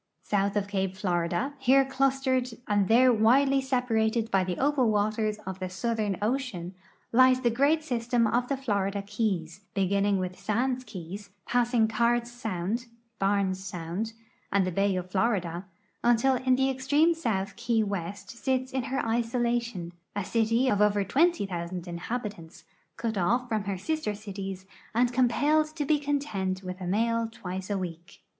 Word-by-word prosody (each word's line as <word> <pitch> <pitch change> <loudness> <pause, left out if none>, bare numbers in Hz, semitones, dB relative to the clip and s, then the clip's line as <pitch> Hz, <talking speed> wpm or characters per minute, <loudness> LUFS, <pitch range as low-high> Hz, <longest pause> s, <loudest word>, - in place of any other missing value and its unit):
South 200 0 0
of 200 -1 0
cape 190 -2 -2
Florida, 180 +7 -1
here 270 +1 +5
clustered 265 -1 +1 0.2
and 205 -2 +2
there 245 +3 +6
widely 270 +5 +4
se[)a 260 -2 0
ratcd 220 0 +1
by 195 -1 +3
the 180 -1 -3
opal 275 -3 +2
waters 215 0 0
of 190 0 -5
the 185 -1 -3
Southern 210 0 -1
ocean, 215 -7 -2 0.4
lies 255 +1 +5
the 240 -2 +2
great 285 +6 +2
system 240 -4 +1
of 240 +3 +1
the 275 - -1
Florida 200 -6 -1
keys, 200 -4 -2
beginning 200 +1 +2
with 185 0 -4
Sands 245 +6 0
key, 190 -3 -7 0.3
passing 240 -2 +2
Cards 235 +2 +1
sound, 225 0 -3 0.3
Barnes 195 -1 +1
sound, 180 +4 -4 0.4
and 200 -1 +3
the 185 - -1
bay 195 +2 +1
of 180 0 -4
Florida, 190 -4 0 0.4
until 240 +3 +4
in 255 0 +2
the 265 +1 +2
extreme 285 +6 +3
south 200 -11 -2
Key 235 -1 +1
West 200 -1 -4
sits 260 +2 -1
in 260 -2 -2
her 265 -1 -2
isolation, 235 -5 -1 0.2
a 205 -2 -2
city 230 +2 +2
t>f 210 -6 +2
over 205 -1 +3
20,000 190 - 0
inhabitants, 175 -1 -5 0.3
cut 225 -4 -2
off 240 +8 +1
fn)in 215 -2 -1
her 195 -1 -1
sister 310 - -2
cities 195 -2 -6 0.3
and 245 +1 +3
eompelled 300 +5 +2
to 295 -3 -2
be 300 0 +3
content 215 -11 -2
with 185 0 -6
a 180 - -4
mail 230 +4 +1
twice 190 -3 -6
a 205 - 0
week. 170 -2 -7
220 Hz, 160 wpm, -28 LUFS, 195-250 Hz, 0.4 s, there